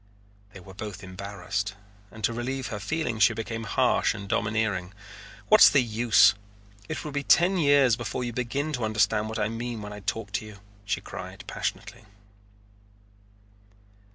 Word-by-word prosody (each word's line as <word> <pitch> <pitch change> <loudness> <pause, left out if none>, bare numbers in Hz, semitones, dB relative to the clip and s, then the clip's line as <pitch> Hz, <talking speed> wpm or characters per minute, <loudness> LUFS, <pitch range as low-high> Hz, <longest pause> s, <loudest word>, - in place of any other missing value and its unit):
They 95 - -10
were 95 +1 -13
both 100 -1 -7
embarrassed, 100 +2 -4 0.3
and 110 +2 -12
to 115 - +1
relieve 130 +2 -3
her 105 -3 -5
feeling 120 +1 -2
she 110 +2 +5
became 115 0 -4
harsh - - +2
and 100 - -8
domineering. 100 -3 -1 0.5
"What's - - +8
the 140 - +4
use? 115 0 +5 0.6
It 155 - -4
will 150 - -4
be 145 0 -2
ten 175 +6 +4
years 140 -6 +4
before 120 +1 -4
you 120 -1 -4
begin 140 +6 -2
to 125 -4 -2
understand 110 0 +1
what 110 - -4
I 105 -1 0
mean 115 0 -5
when 105 0 -7
I 105 - -8
talk 105 0 -4
to 100 +2 -2
you," 105 -2 -11 0.3
she 100 -1 -1
cried 95 0 -8
passionately. - - -5
110 Hz, 160 wpm, -26 LUFS, 100-120 Hz, 0.6 s, What's